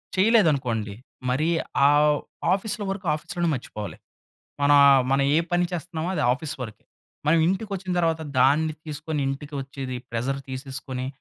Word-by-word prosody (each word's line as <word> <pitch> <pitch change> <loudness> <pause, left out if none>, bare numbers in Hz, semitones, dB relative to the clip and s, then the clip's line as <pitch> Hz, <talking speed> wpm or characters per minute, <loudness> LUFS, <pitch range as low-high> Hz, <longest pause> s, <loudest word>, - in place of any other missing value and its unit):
చేయలేదనుకోండి. 140 - +2 0.3
మరీ 155 +6 +1 0.4
ఆహ్, 150 0 +4 0.4
ఆఫీస్‌లో 205 +1 -2
వర్క్ 195 -1 -6
ఆఫీస్‌లోనే 170 +2 -2
మర్చిపోవాలి. 105 -7 -7 0.7
మనా 145 0 +5 0.2
ఆహ్, 135 -2 +6
మన 135 - +3 0.2
ఏ - - +5
పని 175 0 +3
చేస్తున్నామో 170 0 -4
అది 155 - 0
ఆఫీస్ 145 +2 -4
వరికే. 105 -4 -9 0.4
మనం 165 +2 +5
ఇంటికొచ్చిన 195 0 -2
తరువాత, 165 -1 +1 0.2
దాన్ని 150 +4 +4
తీసుకొని 155 0 -4
ఇంటికి 145 +2 -5
వచ్చేది. 135 -2 -6
ప్రెజర్ 125 +4 -2
తీసేసుకొని. 130 -1 -5
150 Hz, 135 wpm, -25 LUFS, 130-175 Hz, 0.7 s, ఆహ్